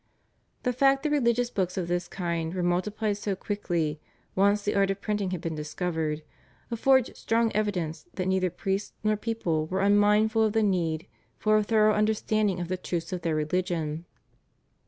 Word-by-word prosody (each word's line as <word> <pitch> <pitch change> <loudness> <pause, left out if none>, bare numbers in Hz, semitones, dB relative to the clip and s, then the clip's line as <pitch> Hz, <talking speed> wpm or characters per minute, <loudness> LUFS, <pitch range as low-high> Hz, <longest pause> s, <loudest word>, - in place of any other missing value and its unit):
The 250 - +1
fact 270 +2 +3
that 305 - 0
religious 245 -4 +2
books 185 -3 -1
of 180 -2 -1
this 175 0 -1
kind 170 -2 -3
were 180 - -1
multiplied 200 +4 0
so 205 -1 -2
quickly, 170 -7 -2 0.3
once 200 +2 +3
the 205 - 0
art 195 -1 +3
of 195 0 -1
printing 205 -2 -1
had 180 -3 -3
been 165 -2 -3
discovered, 155 0 -3 0.5
affords 260 +2 +3
strong 230 0 +1
evidence 195 - -2
that 185 - -2
neither 190 -1 +2
priests 195 +3 -3
nor 215 0 +2
people 190 -8 -1
were 190 +3 -1
unmindful 210 +2 +4
of 215 -1 +1
the 225 -1 +3
need 170 -5 0 0.3
for 215 0 +2
a 215 - +4
thorough 215 0 +4
understanding 215 -2 +1
of 175 - -3
the 185 +1 -2
truths 175 0 -4
of 180 - -3
their 165 -2 0
religion. 160 0 -1
195 Hz, 175 wpm, -27 LUFS, 175-215 Hz, 0.5 s, unmindful